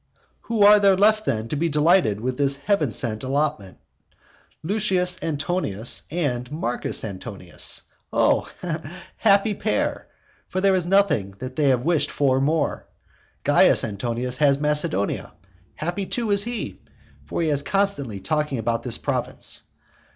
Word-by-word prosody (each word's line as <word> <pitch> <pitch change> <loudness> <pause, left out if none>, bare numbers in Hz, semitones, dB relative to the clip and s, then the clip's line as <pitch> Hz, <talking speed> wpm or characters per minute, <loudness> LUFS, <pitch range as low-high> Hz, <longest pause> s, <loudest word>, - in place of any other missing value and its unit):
Who 225 -3 +3
are 210 +1 +8
there 195 -2 +4
left 215 +2 +4
then 110 -3 -1
to - - -2
be 165 +3 0
delighted 150 - +3
with 125 +3 -3
this 140 -1 +1
heavensent 140 - -1
allotment? 135 -7 -1 0.9
Lucius 185 -1 +1
Antonius 145 - -1
and 140 -6 -2
Marcus 125 -6 -2
Antonius! 95 -3 -3 0.3
O - - +2 0.7
happy 205 0 +3
pair! 215 +2 -1 0.4
for 185 - -3
there 195 0 +3
is 180 -2 0
nothing 180 - +2
that 130 +2 -7
they 140 -3 +3
wished 150 +3 0
for 135 -2 +1
more. 155 +3 0 0.6
Caius - - +4
Antonius 120 +4 -3
has 140 -1 +4
Macedonia. 150 -10 0 0.4
Happy, 175 +5 -3
too, 230 -4 -2
is 200 +1 +2
he! 240 -1 -5 0.4
For - - -2
he 160 - +1
was 145 -1 +1
constantly 145 - -1
talking 150 +1 -1
about 115 +1 -1
this - - +2
province. - - -3
150 Hz, 135 wpm, -23 LUFS, 125-190 Hz, 0.9 s, are